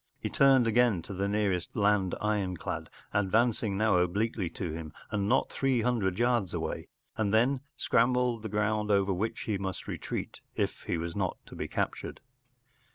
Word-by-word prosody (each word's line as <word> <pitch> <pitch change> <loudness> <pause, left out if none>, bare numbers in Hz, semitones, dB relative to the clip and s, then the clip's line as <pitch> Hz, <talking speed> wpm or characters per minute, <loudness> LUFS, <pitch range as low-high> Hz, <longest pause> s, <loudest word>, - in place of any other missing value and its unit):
He - - -3
turned 135 -3 +5
again 115 -5 +3
to 100 - -7
the 100 +1 -1
nearest 100 -4 0
land 100 -3 +2
ironclad, 100 -5 -2 0.2
advancing 105 +1 +2
now 110 -2 +3
obliquely 95 +2 0
to 85 0 -4
him 80 -2 -6 0.2
and 100 -1 0
not - - +2
three 135 -3 +1
hundred 110 -7 +1
yards 120 -5 +1
away, - - -3 0.3
and 105 -2 +1
then 125 +5 +3 0.2
scanned 120 +2 +3 0.3
the 110 - -5
ground 105 +1 0
over 100 -1 +3
which 105 +5 -2
he 105 -3 -2
must 95 -1 -4
retreat - - -5
if - - -1
he 90 - 0
was 85 +1 -4
not 95 -3 -1
to - - -11
be - - -3
captured. - - -3
105 Hz, 165 wpm, -30 LUFS, 95-115 Hz, 0.3 s, turned